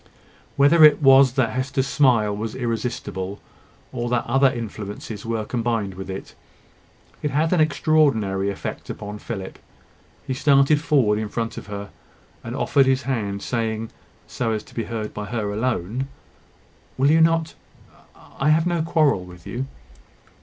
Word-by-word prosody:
Whether 145 +4 +5
it 150 -1 +8
was 135 -3 +6
that 130 -4 +1
Hester's 130 +1 -1
smile 125 -7 +3
was 110 +1 -4
irresistible, 115 -5 -3 0.5
or 120 -1 -3
that 120 -1 0
other 135 0 +4
influences 110 -3 -6
were 115 -2 -2
combined 115 -5 -1
with 95 +1 -8
it, 95 +1 -7 0.9
it 150 - -1
had 155 +5 +1
an 180 - +2
extraordinary 140 -11 +2
effect 100 - -6
upon 105 0 -6
Philip. 95 -5 -7 0.7
He 135 - -2
started 140 +2 +4
forward 130 -10 +2
in 110 -1 -3
front 115 +1 -3
of - - -8
her, 100 -1 -7 0.5
and - - -5
offered 135 -2 +3
his 130 +1 +2
hand, 105 -7 -2
saying, 115 -2 -2 0.3
so 115 -2 -2
as 110 -1 -3
to - - -18
be 115 - -3
heard 110 -2 -5
by 105 - -5
her 105 -2 -3
alone 115 +2 -2 0.9
"Will 135 +3 +4
you 160 +1 +5
not? 165 0 +2 0.9
I 135 - +2
have 160 +2 +4
no 175 -2 0
quarrel 155 - +2
with 90 -2 -13
you." 130 +3 -4
120 Hz, 155 wpm, -23 LUFS, 105-140 Hz, 0.9 s, it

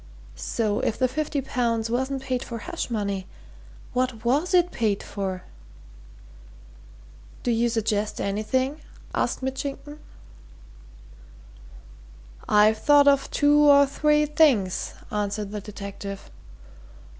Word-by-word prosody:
So 215 -3 -1
if 220 - -1
the 255 - +2
fifty 290 +2 -2
pounds 235 -4 -1
wasn't 265 +2 -1
paid 255 -2 -2
for 235 - -6
hush 225 - -5
money, 200 -4 -2 0.7
what 250 -3 -1
was 290 +9 +1
it 355 -1 +3
paid 210 -3 -1
for?" 190 -2 -4 2.0
"Do 245 - +1
you 235 +1 +2
suggest 215 -2 -1
anything?" 255 +9 -1 0.3
asked - - -1
Mitchington. 280 +3 -5 2.5
"I've 215 +1 +5
thought 290 +2 +5
of 280 -1 +4
two 290 0 +3
or 280 0 +7
three 300 +2 +2
things," 280 - +2 0.2
answered 205 0 -2
the 210 -1 -5
detective. 200 -1 -8
240 Hz, 110 wpm, -25 LUFS, 210-280 Hz, 2.5 s, or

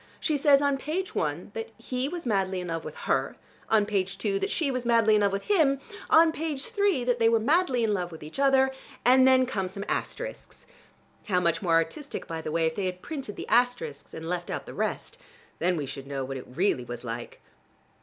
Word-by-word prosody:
She 310 - 0
says 285 0 +5
on 280 -1 +1
page 345 +7 -3
one 155 +5 -2
that 225 0 -5
he 250 +3 -3
was 345 +1 -6
madly 195 -4 0
in 180 -1 -5
love 165 -1 -3
with - - -7
her, - - 0 0.3
on 215 -2 +4
page 195 -2 -1
two 395 0 0
that 395 +1 -1
she 310 -8 0
was 255 -1 -2
madly 230 -2 +4
in 210 - +4
love 200 -1 +3
with 195 0 -2
him, 305 -9 +3 0.3
on 320 0 +6
page 310 -4 -3
three 400 - +1
that 245 0 +1
they 225 0 +5
were 230 0 +3
madly 265 0 +2
in 215 -2 +2
love 180 -3 -2
with 160 -2 -10
each 155 - -8
other, 265 -1 +4 0.3
and 260 +1 +6
then 260 0 +5
come 195 -7 -2
some 200 +2 -7
asterisks. - - -5 0.6
(How 185 -4 +2
much 170 -2 +1
more 175 -4 +1
artistic, 275 - -1
by 165 -1 -5
the 155 - -4
way, 165 +1 +1
if 160 - +1
they 185 0 -1
printed 260 - -7
the - - -7
asterisks 245 -12 0
and 160 0 -6
left 175 0 -3
out - - -4
the - - -9
rest! - - -3 0.4
Then 175 +1 +1
we 145 - -2
should 135 +1 -7
know 135 -1 -3
what 135 +1 -5
it 130 - -9
really 145 -2 0
was 120 0 -7
like.) 120 0 -6
225 Hz, 225 wpm, -27 LUFS, 175-275 Hz, 0.6 s, on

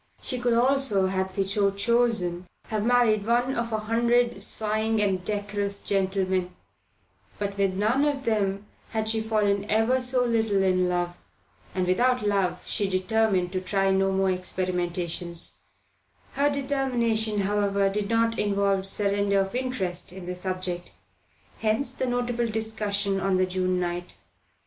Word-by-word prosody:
She 255 - -1
could 240 -1 +1
also, 250 -5 +3
had 190 0 -1
she 195 +1 0
so 200 0 +2
chosen, 200 -4 0 0.2
have 215 -2 -1
married 230 -3 +3
one 240 +4 +1
of 235 -2 -2
a 220 - 0
hundred 235 0 +1
sighing 215 +1 +2
and 195 -3 0
decorous 205 0 -2
gentlemen; 190 -2 -1 0.8
but 200 -1 -3
with 195 -2 0
none 225 +8 +2
of 280 -2 -1
them 200 -2 0 0.3
had 220 -1 -1
she 220 0 +1
fallen 210 -2 0
ever 225 +4 +2
so 250 0 +4
little 220 -4 +1
in 185 -1 +2
love, 175 0 -1 0.6
and 185 -1 0
without 245 +6 +1
love 195 -3 0
she 205 -3 0
determined 190 -1 +1
to 185 -1 -2
try 195 +1 +1
no 195 0 +2
more 190 0 +1
experiments; 175 -2 -1 0.7
her 285 +1 +1
determination, 245 -7 0
however, 200 0 +1
did 200 +1 -2
not 230 0 +1
involve 200 -1 +1
surrender 200 0 +2
of 195 0 -4
interest 240 -10 -2
in 185 -1 -9
the 180 - -4
subject. 180 -1 -3 0.7
Hence 225 +4 0
the 260 - -2
notable 245 -1 -1
discussion 210 -3 -1
on 190 -1 +1
the 185 - +3
June 185 0 -1
night. 175 0 -4
205 Hz, 145 wpm, -26 LUFS, 190-230 Hz, 0.8 s, so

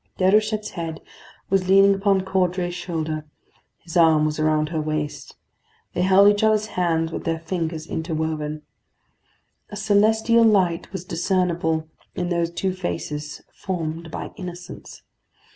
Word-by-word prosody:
Déruchette's 210 +3 +2
head 165 -3 -5 0.5
was 190 -1 +1
leaning 195 +1 +6
upon 195 0 +2
Caudray's 180 -2 0
shoulder; 160 -3 -3 0.5
his 170 - -11
arm 160 -3 +5
was 155 0 -2
around 155 0 +1
her 160 -2 -2
waist; 150 -1 -4 0.6
they 175 - -1
held 190 +2 +6
each 205 +1 +3
other's 215 -1 +3
hands 165 -2 0
with - - -5
their 165 -1 -1
fingers 165 -1 -3
interwoven. 155 -2 -3 1.1
A 210 - -8
celestial 220 +3 +3
light 190 -6 +2
was 190 -2 -6
discernible 170 -2 0 0.3
in 175 -1 -2
those 170 -1 0
two 185 +2 -2
faces 150 -5 -5
formed 165 -3 -4
by - - -6
innocence. 180 -1 -9
175 Hz, 130 wpm, -23 LUFS, 160-195 Hz, 1.1 s, leaning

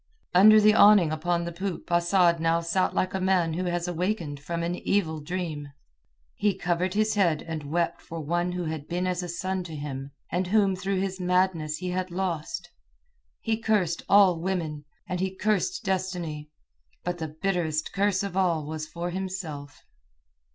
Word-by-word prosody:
Under 215 +4 +8
the 215 0 +6
awning 205 -7 +6
upon 170 +2 0
the 170 - -4
poop 185 +1 -5
Asad 175 0 +3
now 165 +1 +2
sat 170 +3 0
like 185 - 0
a 190 - -1
man 185 -3 +2
who 180 +3 -2
has 175 0 -1
awakened 175 -4 -2
from 170 +4 -4
an 170 +1 -1
evil 160 -6 0
dream. 155 -3 -4 0.6
He 205 -2 +1
covered 180 +1 -1
his 215 +1 +2
head 175 -7 +2
and 155 -3 -6
wept 170 +2 0
for 165 - -7
one 175 +3 -1
who 180 0 -2
had 155 -2 -4
been 180 +1 -1
as 180 -1 -1
a 175 - -5
son 185 +2 -2
to 165 -3 -7
him, 140 -2 -5 0.2
and 180 +2 0
whom 200 -1 +3
through 190 +1 -1
his 190 -1 -3
madness 180 -4 +1
he 180 +1 -4
had 185 0 -2
lost. 175 -1 -3 0.7
He 225 -1 0
cursed 205 -7 +1
all 195 -4 +6
women, 165 -5 -3 0.2
and 180 - -3
he 190 0 -2
cursed 215 - 0
destiny; 180 -6 -2 0.5
but 175 0 -3
the 160 - -3
bitterest 170 -5 -1
curse 200 -1 +1
of 200 -2 -4
all 170 -5 +1
was 155 0 -5
for 175 +2 -4
himself. 175 -7 -6
175 Hz, 175 wpm, -27 LUFS, 165-190 Hz, 0.7 s, Under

